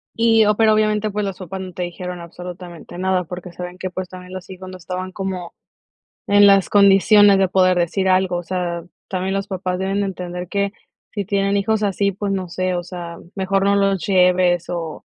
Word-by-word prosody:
Y, 225 -1 +4
o 210 0 +3
pero, 220 0 +4
obviamente, 215 0 +1
pues, 210 0 -2
los 195 -2 -5
papás 190 +1 -6
no 185 -1 -8
te 180 - -6
dijeron 180 +1 -6
absolutamente 175 0 -9
nada, 185 -1 +1
porque 180 +1 -8
saben 180 +1 -8
que, 185 - -3
pues, 185 0 -5
también 180 0 -11
los 185 -1 -8
hijos 185 0 -9
no 185 - -9
estaban 185 +2 -5
como 190 -3 -5 0.7
en 205 0 +6
las 195 -1 +5
condiciones 200 0 +6
de 190 -1 +3
poder 185 0 +3
decir 190 +3 0
algo. 185 -1 +2
O - - -4
sea, 175 -1 -3 0.3
también 190 0 -2
los 195 +1 -2
papás 185 -2 -3
deben 195 +2 -1
de 200 - 0
entender 180 -2 -6
que 200 +1 -1 0.4
si 205 -2 -3
tienen 200 0 +1
hijos 215 +2 0
así, 200 0 +1
pues, 200 +1 -3
no 190 -2 -3
sé, 185 +1 -2
o 175 - -2
sea, 175 -1 -8 0.2
mejor 195 0 0
no 200 0 +3
los 195 -3 +1
lleves 180 -2 +3
o 165 -3 -5
185 Hz, 205 wpm, -20 LUFS, 180-200 Hz, 0.7 s, en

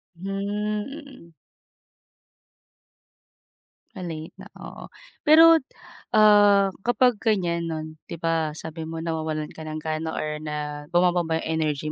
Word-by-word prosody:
Hmm, 185 +3 -7
mm. 210 - -5 2.6
Ah, 190 - -8
late 160 -1 -7
na, - - -10
oo. - - -10 0.4
Pero, 325 +2 +8 0.6
ah, 205 -2 +6
kapag 245 +1 +2
ganyan 175 -7 0
non 155 -1 -4 0.2
'di - - -6
ba 160 -2 0
sabi 160 0 -7
mo 165 0 -5
nawawalan 155 -2 -3
ka 160 -1 -10
ng 155 0 -5
gana 160 0 -3
or 150 0 -3
na 150 -1 -5
bumababa 175 -2 +2
energy 155 -2 -2
165 Hz, 115 wpm, -24 LUFS, 155-205 Hz, 2.6 s, Pero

